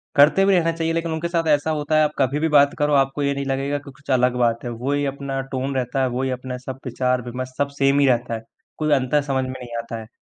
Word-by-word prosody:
करते 155 Hz, +7 st, +6 dB
भी 195 Hz, -, +4 dB
रहना 165 Hz, -2 st, +2 dB
चाहिए 165 Hz, 0 st, 0 dB
लेकिन 165 Hz, 0 st, -1 dB
उनके 160 Hz, +2 st, -2 dB
साथ 170 Hz, -1 st, -1 dB
ऐसा 150 Hz, +1 st, +2 dB
होता 150 Hz, +1 st, -1 dB
है 155 Hz, -, +5 dB
आप 150 Hz, -, +1 dB
कभी 140 Hz, +2 st, +1 dB
भी 160 Hz, -, +1 dB
बात 140 Hz, 0 st, +6 dB
करो 150 Hz, 0 st, +2 dB
आपको 135 Hz, +2 st, -2 dB
ये 140 Hz, 0 st, +1 dB
नहीं 140 Hz, 0 st, -3 dB
लगेगा 135 Hz, +1 st, -1 dB
कि 140 Hz, 0 st, -12 dB
कुछ 140 Hz, +1 st, -20 dB
अलग 125 Hz, -1 st, +3 dB
बात 120 Hz, -1 st, +1 dB
है, 120 Hz, -, -4 dB
वही 135 Hz, +5 st, -1 dB
अपना 140 Hz, -1 st, -3 dB
टोन 135 Hz, +1 st, -2 dB
रहता 130 Hz, +1 st, -1 dB
है, -, -, +2 dB
वही 130 Hz, +2 st, -2 dB
अपना 125 Hz, 0 st, -5 dB
सब 130 Hz, 0 st, -6 dB
विचार-विमर्श 125 Hz, 0 st, -2 dB
सब 145 Hz, 0 st, 0 dB
सेम 140 Hz, +1 st, +4 dB
ही 140 Hz, -, +4 dB
रहता 120 Hz, -2 st, +1 dB
है, 110 Hz, -, -6 dB, 0.4 s
कोई 155 Hz, -1 st, 0 dB
अंतर 135 Hz, +2 st, +2 dB
समझ 130 Hz, 0 st, +1 dB
में 130 Hz, -, -5 dB
नहीं 120 Hz, -1 st, -8 dB
आता 115 Hz, -1 st, -7 dB
है। 110 Hz, -, -11 dB
135 Hz, 265 wpm, -22 LUFS, 125-145 Hz, 0.4 s, करते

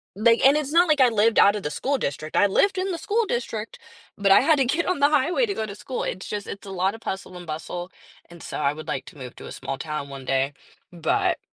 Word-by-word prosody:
Like 230 Hz, +4 st, +3 dB
and 275 Hz, +2 st, +7 dB
it's 295 Hz, -2 st, -2 dB
not 345 Hz, +3 st, +5 dB
like 300 Hz, -3 st, +3 dB
I 255 Hz, -, +7 dB
lived 225 Hz, 0 st, +3 dB
outta 205 Hz, +1 st, +5 dB
the 150 Hz, -, -4 dB
school 275 Hz, -, -1 dB
district. 155 Hz, -, -3 dB
I -, -, +6 dB
lived 380 Hz, -, +2 dB
in 375 Hz, +1 st, -1 dB
the 340 Hz, -, -4 dB
school 455 Hz, +2 st, 0 dB
district, 230 Hz, -, -4 dB, 0.4 s
but 200 Hz, -1 st, +2 dB
I 195 Hz, -, +8 dB
had 315 Hz, -2 st, +4 dB
to 270 Hz, -, +3 dB
get 315 Hz, +7 st, 0 dB
on 365 Hz, -, 0 dB
the 285 Hz, +1 st, +5 dB
highway 315 Hz, -, +2 dB
to 400 Hz, -, -1 dB
go 220 Hz, -, -2 dB
to 205 Hz, -, -7 dB
school. 255 Hz, +4 st, -5 dB
It's 185 Hz, -, -4 dB
just 205 Hz, -1 st, -4 dB
it's 200 Hz, -, -8 dB
a -, -, -7 dB
lot 190 Hz, +1 st, 0 dB
of 225 Hz, -, -11 dB
hustle 190 Hz, -2 st, -5 dB
and 175 Hz, -1 st, -10 dB
bustle, 175 Hz, +3 st, -5 dB, 0.4 s
and 170 Hz, -1 st, -13 dB
so -, -, -6 dB
I 140 Hz, -1 st, +1 dB
would 155 Hz, +1 st, -10 dB
like 135 Hz, -, -3 dB
to -, -, -13 dB
move 125 Hz, -3 st, -9 dB
to -, -, -9 dB
a -, -, -9 dB
small 135 Hz, -, -5 dB
town 150 Hz, -2 st, -4 dB
one 135 Hz, -1 st, -8 dB
day, 135 Hz, +2 st, 0 dB, 0.4 s
but 170 Hz, -3 st, 0 dB
205 Hz, 270 wpm, -24 LUFS, -, 0.4 s, I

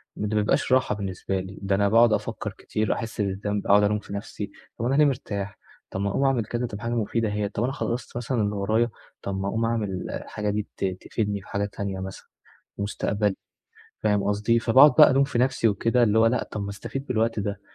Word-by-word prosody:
ده 105 Hz, +1 st, -2 dB
ما 105 Hz, -, +3 dB
بيبقاش 130 Hz, +6 st, +1 dB
راحة 130 Hz, -4 st, +3 dB
بالنسبة 95 Hz, -1 st, -3 dB
لي، 95 Hz, +1 st, -8 dB
ده 100 Hz, 0 st, +1 dB
أنا 100 Hz, 0 st, +2 dB
باقعد 115 Hz, +1 st, +5 dB
أفكّر -, -, -2 dB
كتير، 110 Hz, 0 st, -1 dB
أحِس 110 Hz, -1 st, -4 dB
بالذنب، 100 Hz, +1 st, -2 dB
أقعُد 105 Hz, +1 st, +6 dB
ألوم 105 Hz, +1 st, +2 dB
في 100 Hz, -, -10 dB
نَفسي، 100 Hz, 0 st, -5 dB, 0.3 s
طَب 115 Hz, -, -1 dB
أنا 130 Hz, +3 st, +2 dB
ليه 150 Hz, +1 st, +6 dB
مرتاح، 100 Hz, -7 st, -2 dB, 0.3 s
طَب 95 Hz, -, -4 dB
ما 100 Hz, -, 0 dB
أقوم 120 Hz, -, 0 dB
أعمل 130 Hz, -5 st, +2 dB
كذا 120 Hz, +3 st, -2 dB
تبقى 105 Hz, 0 st, -8 dB
حاجة 115 Hz, -, -1 dB
مفيدة 115 Hz, 0 st, 0 dB
هي، 105 Hz, -1 st, -1 dB
طَب 105 Hz, +2 st, -2 dB
أنا 130 Hz, -, 0 dB
خلّصت 125 Hz, -4 st, -3 dB
مثلًا 120 Hz, 0 st, -1 dB
اللي 105 Hz, 0 st, 0 dB
ورايا، 110 Hz, +4 st, +1 dB, 0.3 s
طَب 95 Hz, -1 st, -3 dB
ما 95 Hz, -, -2 dB
أقوم 110 Hz, +3 st, 0 dB
أعمل 105 Hz, -5 st, -2 dB
الحاجة 105 Hz, -1 st, -4 dB
دي 105 Hz, 0 st, -2 dB
ت -, -, -1 dB, 0.2 s
تفيدني 105 Hz, -3 st, -2 dB
في 100 Hz, -, -17 dB
حاجة 100 Hz, 0 st, -1 dB
تانية 100 Hz, -1 st, -4 dB
مثلًا، 95 Hz, 0 st, -7 dB, 0.5 s
مستقبلي، 100 Hz, 0 st, -1 dB, 0.7 s
فاهم 105 Hz, -2 st, +2 dB
قصدي، 105 Hz, +3 st, +2 dB
فباقعُد 130 Hz, +6 st, +7 dB
بقى 150 Hz, -, +9 dB
ألوم 135 Hz, +1 st, +4 dB
في 135 Hz, -3 st, -1 dB
نَفسي 130 Hz, -2 st, +2 dB
وكده، 115 Hz, +4 st, +2 dB
اللي 110 Hz, -1 st, +3 dB
هو 115 Hz, -, +5 dB
لأ 115 Hz, +1 st, +2 dB
طَب 105 Hz, -, -6 dB
ما 100 Hz, -, -4 dB
أستفيد 120 Hz, +7 st, -6 dB
بالوقت 115 Hz, -2 st, 0 dB
ده، 100 Hz, -1 st, -3 dB
105 Hz, 220 wpm, -25 LUFS, 100-115 Hz, 0.7 s, بقى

